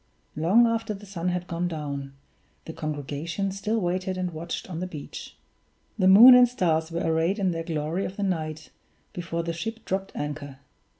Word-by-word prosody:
Long 185 +10 +4
after 225 -2 -1
the 200 +1 -12
sun 180 -3 -3
had 180 0 -2
gone 170 0 -2
down, 140 -4 -5 0.5
the 160 - -7
congregation 155 +6 -3
still 210 +4 -1
waited 185 0 -2
and 180 -1 -2
watched 165 +1 -5
on 170 -3 -5
the 185 - -3
beach. 155 -5 -9 0.6
The 185 - +4
moon 225 +7 +10
and 250 0 +8
stars 165 -8 0
were 170 +1 -2
arrayed 165 +4 +1
in 190 -3 +1
their 165 -1 -3
glory 165 +2 -2
of 190 - -7
the 205 - -2
night 155 -4 -3 0.4
before 170 -1 -3
the 170 0 -3
ship 225 +7 -6
dropped 195 +1 -2
anchor. 145 -2 -5
175 Hz, 180 wpm, -26 LUFS, 160-195 Hz, 0.6 s, moon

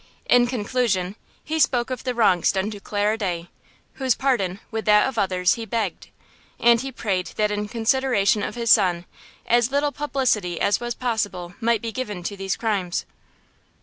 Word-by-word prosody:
In 245 -1 +4
conclusion, 210 -5 -1 0.3
he 320 +1 -2
spoke 250 -4 +2
of 255 - -4
the 250 -1 -1
wrongs 190 -7 +3
done 195 +2 -1
to 205 - -8
Clara 210 +2 -1
Day, 175 -4 -3 0.5
whose 260 -3 +2
pardon, 200 -9 0
with 220 -1 -3
that 210 +2 +5
of 260 -4 -3
others, 185 -2 +2
he 230 - -5
begged. 225 -5 -3 0.5
And 235 -1 +5
he 270 0 -5
prayed 195 -7 -2
that 210 -1 +1
in 210 0 -2
consideration 230 -2 +1
of - - -4
his 235 -1 +1
son, 180 -4 +4 0.4
as 240 0 +3
little 285 +1 +1
publicity 255 - -1
as 200 -1 +2
was 240 0 -4
possible 205 -8 -2
might 230 -1 +1
be 230 - -3
given 210 -7 -5
to 200 - -4
these 195 -1 -2
crimes. 200 -6 -1
220 Hz, 175 wpm, -23 LUFS, 195-245 Hz, 0.5 s, that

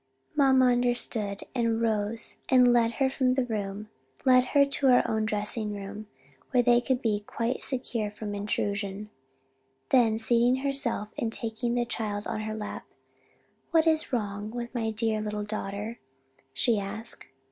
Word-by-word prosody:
Mamma 265 -3 +5
understood, 240 -4 +1
rose 225 -2 0
and 250 -1 +6
led 230 -1 +3
her 270 +2 +2
from 260 -1 +1
the 260 -2 +1
room; 210 -2 -4 0.4
led 255 -1 +6
her 280 +2 +4
to 280 0 0
her 250 -2 +5
own 220 -1 0
dressing 210 0 -2
room 205 +2 -7 0.4
where 250 -2 +3
they 240 0 +5
could 260 +1 -1
be 215 -3 +1
quite 235 +2 -2
secure 240 -5 -2
from 210 0 -6
intrusion. 205 0 -3 0.8
Then 230 -4 +4
seating 240 +3 +2
herself 275 -6 -1
and 225 - -1
taking 235 +1 -2
the 240 0 +1
child 210 -3 -3
on 215 - -3
her 215 0 -4
lap, 210 -1 -6 0.8
"What 325 -1 +4
is 315 -2 +2
wrong 205 -3 -2
with 240 +1 -6
my 230 -3 -1
dear 220 0 -1
little 210 0 -3
daughter?" 210 +2 -5 0.5
she 220 - +1
asked. 215 +3 -7
225 Hz, 150 wpm, -28 LUFS, 210-245 Hz, 0.8 s, and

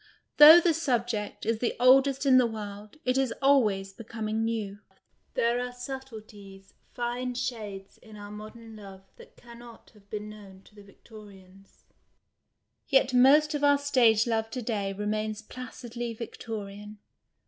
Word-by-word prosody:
Though 310 +3 +11
the 340 -1 +2
siibjeet 240 -8 -2
is 225 0 -1
the 240 - -1
oldest 270 +2 +4
in 260 -2 +6
the 245 - +3
world, 210 +1 -9
it 255 +1 +1
is 265 -3 0
always 215 -9 +2
becoming 220 0 -4
new. 215 -3 -3 0.6
There 235 +1 +1
are 250 0 -4
subtleties, 215 -7 -10 0.2
fine 245 +1 -3
shades, 210 -6 -6
in 220 -2 -15
our 205 0 -10
modern 215 +1 -11
love 195 -2 -12
that 475 +1 -17
can 235 -1 -14
not 235 -1 -15
have 200 -2 -23
been 210 0 -6
known 200 -3 -13
to - - -22
the 205 - -15
Victorians; 195 -2 -17 1.0
yet 270 -2 +2
most 290 +5 +5
of 295 -1 -3
our 285 0 +5
stage 240 -6 +3
love 225 -2 -1
to 250 +1 -6
day 205 -4 -2
remains 215 +2 -3
placidly 240 -1 -7
Victorian. 210 -2 -8
225 Hz, 150 wpm, -27 LUFS, 210-250 Hz, 1.0 s, Though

